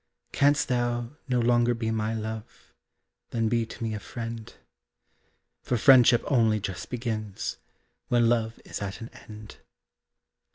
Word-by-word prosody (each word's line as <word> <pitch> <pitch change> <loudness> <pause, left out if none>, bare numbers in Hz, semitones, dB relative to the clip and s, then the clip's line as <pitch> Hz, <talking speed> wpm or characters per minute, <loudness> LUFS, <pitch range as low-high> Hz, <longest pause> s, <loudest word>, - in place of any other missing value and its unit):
Canst 145 +1 +3
thou 120 -1 -1 0.2
no 125 -1 +2
longer 120 0 +3
be 115 -1 -2
my 110 0 -1
love, 110 +1 -7 0.6
Then 115 -2 0
be 115 -1 +1
to 115 - -8
me 110 -1 -2
a 105 - -4
friend; 115 +1 -7 1.1
For 125 - -1
friendship 125 -1 +6
only 115 -6 +3
just 95 -2 -5
begins 110 -5 -4 0.5
When 120 -1 +3
love 115 -1 0
is - - -6
at 100 +3 -5
an 115 - -7
end. 105 -1 -12
115 Hz, 135 wpm, -27 LUFS, 110-120 Hz, 1.1 s, friendship